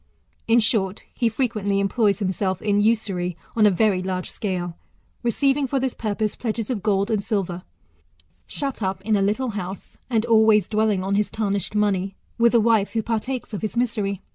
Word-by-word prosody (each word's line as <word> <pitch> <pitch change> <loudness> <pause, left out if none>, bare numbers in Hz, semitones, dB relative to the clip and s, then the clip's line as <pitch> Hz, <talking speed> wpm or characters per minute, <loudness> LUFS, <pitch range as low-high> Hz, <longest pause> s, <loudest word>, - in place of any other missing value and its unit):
In 230 +1 +5
short, 210 -3 0
he 235 - +1
frequently 215 -5 0
employs 200 +1 +2
himself 190 -1 -1
in 205 -1 +1
usury 195 -6 0 0.2
on 215 -2 +5
a - - +7
very 200 -1 +2
large 185 -1 -3
scale, 180 -4 -3 0.5
receiving 270 +4 +1
for 270 +1 0
this 260 -1 -1
purpose 215 -1 -2
pledges 225 0 -3
of 220 -5 -2
gold 200 0 +1
and 210 -2 0
silver; 190 -5 -2 0.9
shut 275 -4 -3
up 190 -1 -2
in 215 +1 +2
a 200 - +2
little 215 +6 0
house, 195 -2 -6
and 225 -2 +1
always 220 -3 +5
dwelling 215 -3 +1
on 195 +1 -1
his 205 +1 +1
tarnished 200 -1 -2
money, 195 -2 +1 0.2
with 235 +1 +4
a - - +7
wife 220 -2 +2
who 225 -1 0
partakes 230 +2 -3
of 205 - -3
his 220 +1 -3
misery. 210 -5 -1
210 Hz, 180 wpm, -23 LUFS, 195-230 Hz, 0.9 s, a